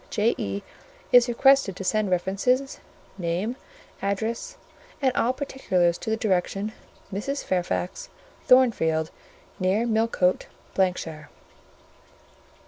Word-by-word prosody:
J.E. 100 - -1 0.5
is 245 -1 +6
requested 270 -4 +4
to 195 - -6
send 210 +2 +1
references, 200 +10 0 0.4
name, 180 +7 -1 0.5
address, 225 - -2 0.4
and 265 -3 +2
all 240 - +2
particulars 190 - 0
to - - -5
the 220 - +1
direction:— 200 0 -1 0.4
"Mrs. 275 +9 -3
Fairfax, 180 0 -2 0.4
Thornfield, 165 -12 +4 0.5
near 195 +5 +1
Millcote, 220 -5 +1 0.3
——shire." 165 -5 -1
205 Hz, 95 wpm, -25 LUFS, 180-245 Hz, 0.5 s, is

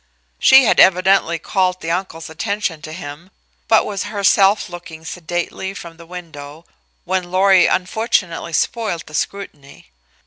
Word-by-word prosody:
She 265 0 +7
had 235 - +2
evidently 185 -2 +4
called 185 +2 -1
the 165 - -4
uncle's 170 -2 -4
attention 175 -1 -3
to 155 - -9
him, 160 +1 -9 0.4
but - - +4
was 200 -2 -4
herself 200 0 +2
looking 170 -2 -11
sedately 175 +3 -5
from 170 -3 -10
the 170 -1 -14
window 160 -3 -10 0.4
when 185 0 -2
Lorry 190 0 +4
unfortunately 185 -3 -1
spoiled 210 -4 -1
the 155 - -15
scrutiny. 145 - -6
180 Hz, 135 wpm, -18 LUFS, 165-195 Hz, 0.4 s, She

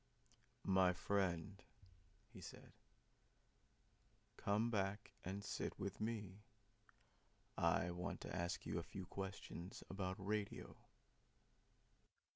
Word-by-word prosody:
] - - -35 0.2
"My 90 -1 +7
friend," 95 0 +1 0.7
he 95 - -8
said, - - -8 1.6
"come 110 +4 +3
back 100 -1 +1
and 95 +3 -2
sit - - -1
with 100 +1 -2
me; 105 -3 -1 1.1
I 90 - +4
want 90 +1 -2
to - - -3
ask 85 +2 0
you - - +1
a 85 - -6
few 95 -1 -4
questions 95 -1 -4
about 95 -1 0
radio." 105 +1 -1
95 Hz, 100 wpm, -44 LUFS, 90-100 Hz, 1.6 s, My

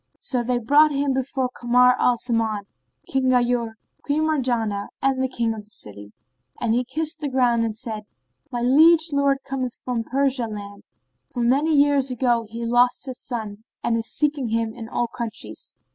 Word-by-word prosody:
So 250 -3 -1
they 245 +1 0
brought 285 +6 +5
him 280 -1 0
before 260 -1 -1
Kamar 250 +1 +4
al 245 - +3
Zaman, 225 -3 -1 0.4
King 265 -1 +1
Ghayur, 245 -2 +2 0.3
Queen 295 +2 0
Marjanah 240 -9 0
and 270 -1 +1
the 260 - +1
King 235 -3 -1
of 220 - -7
the 210 - -18
city; 105 - -8 0.5
and 230 -2 +1
he 245 +2 +2
kissed 315 +5 -3
the 295 -2 -2
ground 245 -3 +2
and 220 -1 -3
said, 215 -2 -5 0.5
"My 240 - -2
liege 315 +5 +5
lord 280 -1 +2
cometh 255 -3 -3
from 245 -2 -1
Persia 265 -1 0
land; 205 -2 -8 0.5
for 245 - -4
many 285 +6 +3
years 285 -2 +3
ago 240 -3 +1
he 230 +1 -5
lost 245 +3 +2
his 260 -2 -6
son 220 -4 -5 0.2
and 230 - +1
he - - +1
is 225 - -5
seeking 290 -5 0
him 225 0 -1
in 225 -1 -8
all 240 - 0
countries. 235 -1 -6
245 Hz, 180 wpm, -23 LUFS, 230-270 Hz, 0.5 s, brought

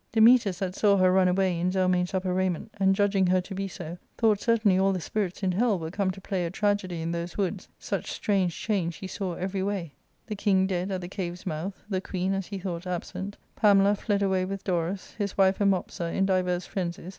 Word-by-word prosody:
Dametas, 225 -4 +5
that 185 -1 -2
saw 200 0 +3
her 185 -1 +4
run 190 -1 +4
away 180 -1 +1
in 180 +1 +1
Zelmane's 185 -1 +1
upper 185 -1 0
raiment, 185 +2 -1
and 195 0 +4
judging 195 -2 +2
her 185 +1 +3
to 195 - -8
be 195 +1 -3
so, 175 -2 -8 0.2
thought 220 -3 +3
certainly 220 -5 +3
all 195 0 +3
the 185 - -2
spirits 195 +2 -3
in 185 - +2
hell 210 +2 +2
were 160 -1 -5
come 195 0 0
to 185 - -5
play 190 -1 -2
a 170 - -1
tragedy 190 -3 -1
in 165 - -2
those 170 +1 -4
woods, 195 -1 -2
such - - -4
strange 190 -5 0
change 185 -6 -1
he 190 - -8
saw 185 -2 -4
every 190 +2 -3
way: 190 -6 -3 0.3
the 215 - -4
king 195 -2 +2
dead 185 0 -1
at 190 -2 -2
the 175 - -6
cave's 180 -1 -5
mouth; 180 +3 -4
the 190 -3 -1
queen, 190 0 -2
as 195 -1 -2
he 200 - -5
thought, 180 -1 -5
absent; 190 +3 -4 0.2
Pamela 200 -1 +5
fled 205 -1 0
away 190 -1 +2
with 195 +1 -4
Dorus; 180 +1 -2
his 200 -1 -2
wife 195 0 +3
and 200 - +5
Mopsa 175 -2 -1
in 195 - +1
divers 185 -2 +1
frenzies. 175 -2 -4
190 Hz, 225 wpm, -27 LUFS, 180-200 Hz, 0.3 s, Dametas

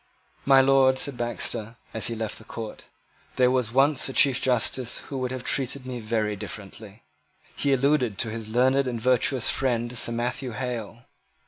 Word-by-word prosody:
"My 135 -1 +7
Lord," 135 -1 +4
said 140 0 -2
Baxter, 120 -1 -3 0.2
as 110 -2 0
he 115 - -3
left 110 -1 -4
the - - -13
court, 110 -1 -8 0.5
"there 125 -1 +4
was 125 -3 0
once 135 +2 +3
a - - -6
Chief 135 -2 +4
Justice 125 0 +1
who 140 - -7
would 130 -1 -2
have 130 -1 -5
treated 135 0 -1
me 125 -1 -5
very 110 -1 -1
differently." 100 +2 -9 0.5
He 140 - 0
alluded 135 -5 +2
to 115 - -1
his 110 -1 -6
learned 130 +4 +2
and 120 -2 -3
virtuous 125 +1 +2
friend 120 -2 -1
Sir 120 - -2
Matthew 125 +1 -3
Hale. 120 -2 -5
125 Hz, 175 wpm, -25 LUFS, 115-130 Hz, 0.5 s, My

